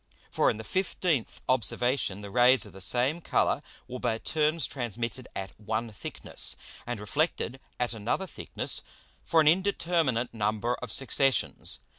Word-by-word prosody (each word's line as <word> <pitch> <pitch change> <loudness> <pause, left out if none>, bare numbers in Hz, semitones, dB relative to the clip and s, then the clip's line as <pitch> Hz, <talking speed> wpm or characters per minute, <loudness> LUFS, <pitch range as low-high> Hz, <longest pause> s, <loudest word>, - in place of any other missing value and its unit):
For - - +3
in - - -1
the 110 - -6
15th 175 - 0
Observation 125 -4 +1
the 100 -1 -8
Rays 125 +2 +6
of 105 - -12
the 95 - -10
same 125 - +1
Colour - - +2 0.3
were 125 0 -6
by 120 -3 0
turns 155 +3 +1
transmitted 120 -1 -3
at 95 -1 -4
one 110 +2 -2
thickness, 105 - -1 0.3
and 120 -3 -3
reflected 135 +3 -1 0.2
at 125 -1 0
another 115 - -1
thickness, - - -3 0.4
for 165 - +3
an 155 - +3
indeterminate 165 - +2
number 110 +2 0
of - - -5
Successions. 135 0 +1
125 Hz, 145 wpm, -29 LUFS, 110-150 Hz, 0.4 s, Rays